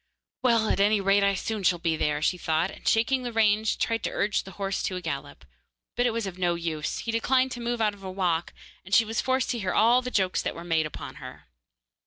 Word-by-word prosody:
'Well, 230 -3 +3
at - - 0
any 205 +1 +4
rate, 195 +1 +3
I 200 0 +3
shall 215 +2 -3
soon 180 -1 +3
be 165 -1 0
there,' 150 -1 -1
she 180 - +2
thought, 160 +3 0
and - - -11
shaking 255 +4 +2
the 245 -1 -4
reins, 220 -1 +2
tried 230 -1 -1
to - - 0
urge 205 +1 0
the 190 - -11
horse 195 -1 -2
to 185 - -2
a - - -3
gallop. 140 - -6 0.5
But 245 +1 +2
it - - +1
was 230 -1 -2
of 185 -1 -7
no 175 -1 +1
use; 160 -3 -3
he 230 - -3
declined 255 +3 +2
to 240 - -6
move 235 0 -2
out 210 -1 +2
of 200 - -15
a 190 - -5
walk; 180 -3 -1 0.3
and 190 +3 0
she 225 - +6
was 225 +1 -1
forced 260 0 0
to 240 - -2
hear 190 -3 -2
all 235 +3 +5
the 250 - -4
jokes 190 -6 +1
that - - -3
were 170 - -8
made 165 -2 +1
upon - - -9
her. - - -10
200 Hz, 255 wpm, -26 LUFS, 175-230 Hz, 0.5 s, she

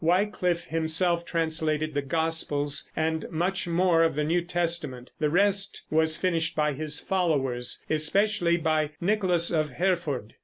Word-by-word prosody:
Wyclif 180 0 +1
himself 170 +1 +1
translated 160 -2 0
the 145 - 0
gospels, 145 -1 -1
and 160 0 -1
much 180 +3 -2
more 170 -1 +2
of 165 -3 +2
the 150 - 0
New 170 +4 +1
Testament; 170 -7 -1
the 150 - +1
rest 200 +4 +1
was 160 0 +3
finished 165 -3 -1
by 150 -1 +1
his 150 +2 -2
followers, 140 -10 -1
especially 170 +3 +2
by 155 -2 0
Nicholas 180 -3 +1
of 155 -3 0
Hereford. 165 - -2
165 Hz, 140 wpm, -26 LUFS, 155-175 Hz, -, was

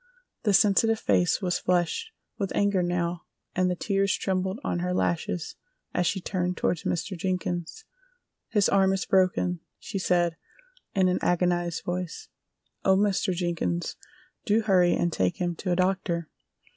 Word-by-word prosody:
The 205 - +2
sensitive 220 +3 +4
face 175 +1 +2
was 180 -1 0
flushed 180 - 0 0.3
with 195 -2 -1
anger 200 -2 +2
now 175 0 -1 0.3
and 185 0 +2
the 180 - 0
tears 195 +1 +1
trembled 190 +2 -1
on 175 - -1
her 180 +1 -1
lashes 170 -1 -1 0.4
as 180 -1 +1
she 195 - 0
turned 180 -1 -2
toward 175 - 0
Mr. 175 +4 -2
Jenkins. 180 - -3 0.6
"His 205 -3 +2
arm 195 -1 +3
is 190 - -1
broken," 185 -2 +2 0.2
she 195 - -5
said, 175 -2 +1 0.6
in 190 -1 +4
an 180 - +1
agonized 175 -1 +1
voice. 180 -1 -4 0.5
"Oh, 190 0 +4
Mr. 200 -1 +1
Jenkins, 175 -1 -2 0.5
do 215 +1 +2
hurry 185 -4 +4
and 170 -1 0
take 90 -1 0
him 175 -1 -1
to 185 - -2
a - - +3
doctor!" 180 -3 0
180 Hz, 150 wpm, -27 LUFS, 175-195 Hz, 0.6 s, sensitive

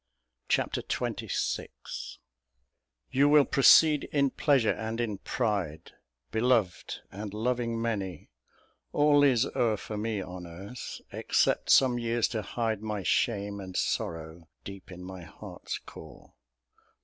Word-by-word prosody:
Chapter - - +1
XXVI - - -2 1.4
You 140 +2 +4
will 145 -1 +6
proceed 150 +2 +6
in 140 -2 +2
pleasure 135 -7 +3
and 110 +1 -4
in 110 -5 -2
pride, 100 - -2 0.4
Beloved, 110 -5 +1
and 105 +1 -6
loving 115 0 -1
many; 100 - -3 0.6
all 145 -1 +5
is 130 -3 +4
o'er 110 -3 +2
For 105 +2 -6
me 110 0 -2
on 90 -1 -7
earth, 95 +9 -8
except - - +1
some 125 -2 +5
years 115 -1 +1
to 110 - -2
hide 110 -2 -2
My 105 -2 -3
shame 100 0 0
and 95 -2 -6
sorrow 80 0 -3 0.2
deep 100 -1 -10
in 90 0 -9
my 95 0 -8
heart's 85 - -7
core. - - -13
110 Hz, 125 wpm, -29 LUFS, 95-125 Hz, 1.4 s, will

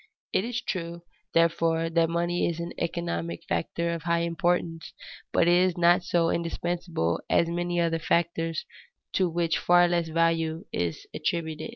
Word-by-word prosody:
It - - +2
is 240 +1 -3
true, 170 -2 -4 0.3
therefore, 165 0 +2
that 165 0 +2
money 175 +1 0
is 170 -1 -4
an 170 0 -5
economic 170 0 -3
factor 170 +1 -2
of 165 - -4
high 170 0 +1
importance, 170 0 -1 0.4
but - - +3
it 175 - +5
is 180 0 +3
not 175 +2 +5
so 170 -1 +2
indispensable 170 - -2
as 170 - +3
many 175 +1 -1
other 165 -1 +1
factors 165 -1 0 0.5
to 185 -2 +2
which 170 0 0
far 175 0 +5
less 170 -1 0
value 165 0 0
is 85 -2 -2
attributed. 160 +3 -2
170 Hz, 155 wpm, -27 LUFS, 165-175 Hz, 0.5 s, it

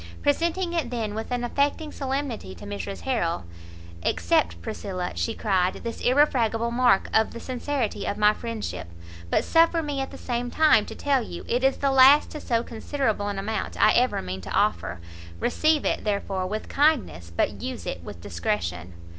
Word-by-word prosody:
Presenting 340 +4 +1
it 320 -8 -1
then 225 -4 -3
with 220 +1 -5
an 245 0 -1
affecting 285 +5 0
solemnity 265 - -3
to 85 - -11
Mrs 100 -2 -5
Harrel, 85 +1 -1 0.6
"accept, 85 0 +1
Priscilla," 180 - -4
she 225 - -2
cried, 190 -4 +1
"this 230 -1 -5
irrefragable 240 -4 +2
mark 240 -5 +3
of 220 0 +3
the 235 - -7
sincerity 255 -1 -2
of 205 - -2
my 210 0 +5
friendship; 230 - -5 0.4
but - - +2
suffer 330 0 +3
me 290 -2 -2
at 270 - -3
the - - -10
same 245 0 -3
time 275 -8 +4
to - - -7
tell 280 -2 +1
you, 175 -6 -7
it 245 +2 0
is 270 0 +3
the 275 -1 +1
last 270 +2 +7
to 300 - -6
so 235 -2 0
considerable 225 -3 -2
an 200 -1 -3
amount 215 +3 -3
I - - +6
ever 250 - +2
mean 95 +1 -5
to - - -9
offer; 85 +1 0 0.4
receive 310 +4 +2
it, - - 0
therefore, 200 -3 -1
with 215 +3 -4
kindness, 275 - +1
but - - 0
use 255 0 -5
it 85 - -5
with 85 - -9
discretion." 90 -1 -3
230 Hz, 180 wpm, -25 LUFS, 185-275 Hz, 0.6 s, last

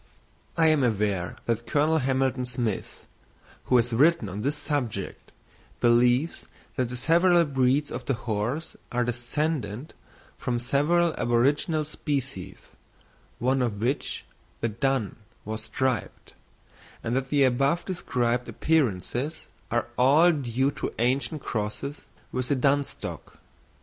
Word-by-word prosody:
I 165 - +5
am 155 -3 +3
aware 100 -6 0
that 115 0 -1
Colonel 155 +2 +3
Hamilton 130 -1 0
Smith, 120 -4 -3 0.6
who 125 - +4
has 120 0 +1
written 145 - +3
on 100 +3 -5
this 140 +6 0
subject, 125 -10 -3 0.5
believes 120 +6 +3 0.3
that 125 -3 0
the 125 - -5
several 170 +4 +4
breeds 135 +1 +1
of - - -6
the 135 - +1
horse 115 +7 -3 0.2
are 125 0 +1
descended 125 0 -2 0.5
from 120 -1 -1
several 150 +7 +2
aboriginal 145 +6 +2
species, 135 - -4 0.7
one 130 +2 +1
of 110 -5 -1
which, 125 +6 -2 0.3
the 115 - 0
dun, 125 0 -1 0.3
was 110 0 -4
striped; 130 -2 -2 0.7
and 115 +1 -1
that 135 0 -1
the 145 -2 +4
above 135 +6 +2
described 125 -9 -1
appearances 145 - 0 0.2
are 120 - 0
all 150 +7 +6
due 135 -2 0
to - - -5
ancient 135 +5 0
crosses 110 +6 -4 0.3
with 125 -1 -2
the 140 - +2
dun 140 +2 +3
stock. - - -7
130 Hz, 125 wpm, -26 LUFS, 120-145 Hz, 0.7 s, all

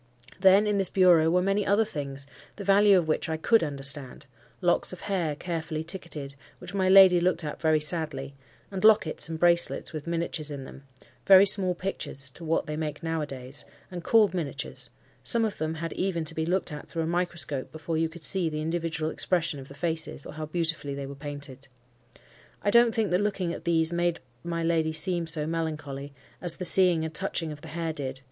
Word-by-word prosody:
Then, 195 +2 +6
in 210 -1 +1
this 190 - +1
bureau, 175 -4 +4
were 180 +2 +2
many 195 +2 +1
other 205 +3 +2
things, 140 -6 -6 0.3
the 205 - -7
value 200 0 +5
of 170 -3 0
which 160 - -1
I 160 - -1
could 225 +6 +3
understand—locks 140 +2 -2
of 180 - -9
hair 175 -7 -2
carefully 160 -1 -4
ticketed, 160 -5 -4 0.2
which 180 +1 -10
my 190 -2 +1
lady 190 -2 +8
looked 175 -1 0
at 150 - -6
very 155 -1 +3
sadly; 150 -4 -3 0.4
and 190 0 -5
lockets 210 -8 +3
and 160 -1 -5
bracelets 170 0 +2
with 155 0 -7
miniatures 165 -2 0
in 140 -2 -6
them,—very 140 +9 +2
small 190 -2 +2
pictures 140 -7 -4
to 170 - -10
what 165 0 0
they 150 0 -4
make 155 -1 -5
now 165 -1 -2
a 150 - -3
days, 135 0 -5 0.3
and 175 -2 -7
called 215 0 +4
miniatures: 150 -4 -3 0.3
some 230 -1 +2
of 215 - -4
them 155 +1 -2
had 165 +1 -5
even 180 -4 -2
to 155 - -4
be 160 0 -3
looked 180 -1 -1
at 150 0 -8
through 165 - -3
a - - -2
microscope 170 -5 -2
before 160 +1 -5
you 160 0 0
could 165 0 -13
see 180 -2 +1
the 155 -1 -4
individual 160 -1 -2
expression 170 -5 +2
of 135 - -10
the 140 - -13
faces, 160 -3 -1
or - - -8
how 155 0 -6
beautifully 165 -3 -2
they 140 0 -5
were 140 - -7
painted. 140 -2 -5 1.0
I 205 - +2
don't 235 0 +5
think 220 -4 0
that 180 +2 +2
looking 195 -4 -1
at - - -9
these 165 -1 +3
made 175 0 0 0.2
may 170 -1 -3
lady 160 -1 +1
seem 170 +1 0
so 155 -2 +4
melancholy, 150 -4 -4 0.3
as 175 -2 +1
the 180 - -4
seeing 175 -2 +5
and 160 - -6
touching 165 -3 -1
of 150 -1 -9
the 160 - -11
hair 165 0 -4
did. 135 -3 -5
165 Hz, 205 wpm, -27 LUFS, 150-180 Hz, 1.0 s, lady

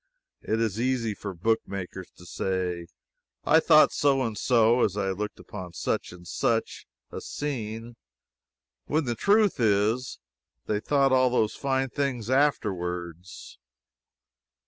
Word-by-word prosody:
It 110 - -1
is 115 -1 -1
easy 125 -3 0
for 100 0 -6
book 110 +6 +1
makers 95 -1 -6
to 90 - -14
say 90 -1 -3 0.6
"I 160 - +5
thought 155 -1 +6
so 135 -2 +2
and 115 -3 -3
so 120 +1 +3
as 100 -1 0
I 95 -2 0
looked 105 +2 -5
upon 90 -4 -9
such - - -2
and 90 0 -13
such - - -1 0.2
a - - -6
scene" 115 -5 -5 0.9
when 155 0 0
the 120 - -1
truth 205 - +3
is, 110 +3 +1 0.5
they 105 -1 -1
thought 135 +3 +2
all 130 -1 +4
those 110 -3 +1
fine 135 -1 -1
things 130 -4 -2
afterwards. 90 - -2
110 Hz, 135 wpm, -26 LUFS, 95-130 Hz, 0.9 s, thought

